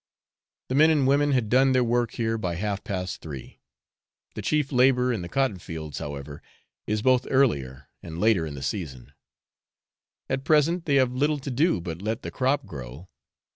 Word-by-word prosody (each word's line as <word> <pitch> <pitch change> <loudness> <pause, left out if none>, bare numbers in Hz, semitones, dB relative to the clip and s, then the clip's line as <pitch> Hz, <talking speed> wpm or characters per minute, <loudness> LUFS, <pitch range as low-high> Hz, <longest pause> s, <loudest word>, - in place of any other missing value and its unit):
The - - -1
men 155 +4 +6
and 150 -4 +3
women 145 +2 +3
had 125 -4 +1
done 130 +4 +4
their 130 -1 +3
work 120 -1 0
here 115 -1 -1
by 90 -6 -2
half 100 +2 -3
past 90 -2 -4
three. 70 -5 -9 0.7
The - - -5
chief 150 -2 0
labour 125 -1 +3
in 110 - -3
the 85 - -7
cotton 130 -4 0
fields, 80 -5 -7
however, 70 0 -7 0.5
is 105 0 -1
both 130 -1 +3
earlier 70 - +1
and 80 -1 -8
later 105 -5 +3
in 75 - -7
the 70 - -7
season. 65 -4 -5 1.1
At 135 - -2
present 160 +3 +2
they 140 - +3
have 130 -2 +3
little 145 +4 +1
to 140 0 -6
do 145 - +2
but 85 0 -6
let 110 +3 -3
the - - -5
crop 135 +2 0
grow. 70 +5 -9
115 Hz, 180 wpm, -26 LUFS, 85-135 Hz, 1.1 s, men